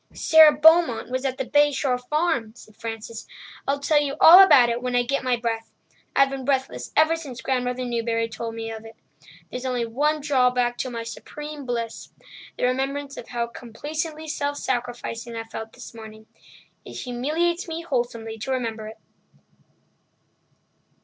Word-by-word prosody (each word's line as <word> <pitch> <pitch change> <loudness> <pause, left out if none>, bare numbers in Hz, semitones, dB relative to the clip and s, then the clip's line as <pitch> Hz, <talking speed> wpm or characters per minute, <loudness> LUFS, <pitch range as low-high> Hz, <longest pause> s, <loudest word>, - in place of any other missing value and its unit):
"Sara 315 -1 +7
Beaumont 300 -5 +4
was 260 +1 -2
at 260 -1 -1
the 265 - -2
Bay 290 +2 +4
Shore 260 -3 0
Farm," 250 -4 -1
said 215 -3 -16
Frances. 225 0 -7 0.4
"I'll 275 +1 +1
tell 295 +1 +2
you 280 -1 -2
all 350 +4 +10
about 265 -10 +7
it 235 +1 -2
when 250 0 -2
I 245 - +3
get 275 +3 -1
my 255 -1 +2
breath—I've 235 +3 -2
been 270 -1 -5
breathless 265 0 -2
ever 315 +1 +5
since 280 -7 -8
Grandmother 250 -1 -1
Newbury 230 -1 -1
told 225 0 -6
me 225 0 -5
of 220 0 -8
it. 225 0 -12 0.6
There's 250 - -5
only 250 -2 -1
one 295 +7 0
drawback 250 -4 +1
to 255 - -2
my 230 -2 -5
supreme 295 +4 -8
bliss—the 235 0 -7
remembrance 275 +2 -2
of - - -9
how 240 -1 -2
complacently 305 +7 -6
self 285 -1 -2
sacrificing 240 -2 -4
I 225 - -4
felt 225 0 -8
this - - -11
morning. 220 -1 -11 0.6
It - - -11
humiliates 310 +9 -1
me 330 0 -5
wholesomely 235 -6 -3
to 240 +5 -4
remember 225 -4 -3
it!" 220 0 -10
250 Hz, 160 wpm, -24 LUFS, 230-290 Hz, 0.6 s, all